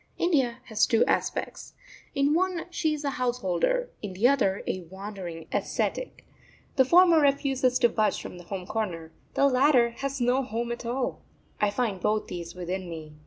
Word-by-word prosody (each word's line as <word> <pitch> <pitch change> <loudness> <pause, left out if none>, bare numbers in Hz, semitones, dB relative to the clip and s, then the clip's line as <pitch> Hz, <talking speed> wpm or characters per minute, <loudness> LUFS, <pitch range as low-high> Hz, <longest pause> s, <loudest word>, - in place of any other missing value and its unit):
India 270 -9 +1
has 220 -4 +1
two 230 -3 +3
aspects - - -2 0.4
in 280 +1 +3
one 360 0 0
she 320 -2 0
is 300 -1 -3
a 280 - 0
householder, 250 - 0
in 205 -3 -5
the 205 +7 +3
other 245 -8 +2
a 185 - -2
wandering 190 -4 -7
ascetic. - - -2 0.5
The 265 - +5
former 345 +2 +6
refuses 270 -3 +2
to 240 - +4
budge 215 -1 +1
from 180 - -8
the 175 - -12
home 185 0 -5
corner, 180 -7 -3 0.2
the 280 - +4
latter 255 -2 +4
has 275 +3 -4
no 250 +2 +2
home 235 -1 -3
at 235 0 -5
all. 250 +2 -2 0.4
I 210 - +3
find 205 -4 -2
both 215 +3 +1
these 170 -1 -7
within 180 +1 -4
me. 155 -2 -8
235 Hz, 170 wpm, -27 LUFS, 190-275 Hz, 0.5 s, former